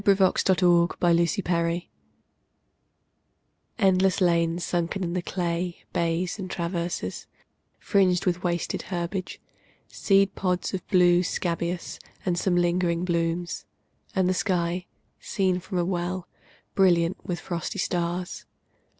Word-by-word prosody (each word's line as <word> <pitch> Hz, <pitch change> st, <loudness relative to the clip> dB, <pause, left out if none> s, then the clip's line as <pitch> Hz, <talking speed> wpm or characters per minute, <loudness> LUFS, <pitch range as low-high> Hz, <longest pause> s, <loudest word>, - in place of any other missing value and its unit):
Frederic 200 Hz, -1 st, +4 dB, 0.8 s
Manning 170 Hz, -1 st, +4 dB
THE 200 Hz, -, -2 dB
TRENCHES 170 Hz, 0 st, 0 dB, 1.9 s
ENDLESS 190 Hz, -3 st, +3 dB
lanes 170 Hz, -1 st, +2 dB
sunken 175 Hz, +2 st, -1 dB
in 170 Hz, -1 st, -2 dB
the 180 Hz, -, 0 dB
clay, 175 Hz, -1 st, -3 dB
Bays, 170 Hz, +3 st, 0 dB
and 185 Hz, -1 st, -5 dB
traverses, 170 Hz, 0 st, -3 dB, 0.5 s
fringed 185 Hz, -3 st, +2 dB
with 180 Hz, -1 st, 0 dB
wasted 175 Hz, -2 st, -1 dB
herbage, 180 Hz, +1 st, -3 dB, 0.5 s
Seed 195 Hz, -1 st, +2 dB
pods 180 Hz, -1 st, -1 dB
of 190 Hz, -, -4 dB
blue 180 Hz, -2 st, +5 dB
scabious, 170 Hz, -1 st, -2 dB, 0.3 s
and 180 Hz, -2 st, +1 dB
some 175 Hz, +1 st, +1 dB
lingering 175 Hz, 0 st, +1 dB
blooms; 170 Hz, 0 st, -1 dB, 0.5 s
And 190 Hz, -2 st, +3 dB
the 185 Hz, -, +2 dB
sky, 180 Hz, -2 st, -1 dB, 0.3 s
seen 190 Hz, -2 st, 0 dB
as 180 Hz, -, -8 dB
from 190 Hz, -1 st, -4 dB
a 175 Hz, -, +1 dB
well, 180 Hz, 0 st, -2 dB, 0.5 s
Brilliant 180 Hz, -1 st, +3 dB
with 175 Hz, -1 st, -3 dB
frosty 170 Hz, -3 st, -4 dB
stars. 175 Hz, 0 st, -2 dB
175 Hz, 120 wpm, -26 LUFS, 170-185 Hz, 1.9 s, blue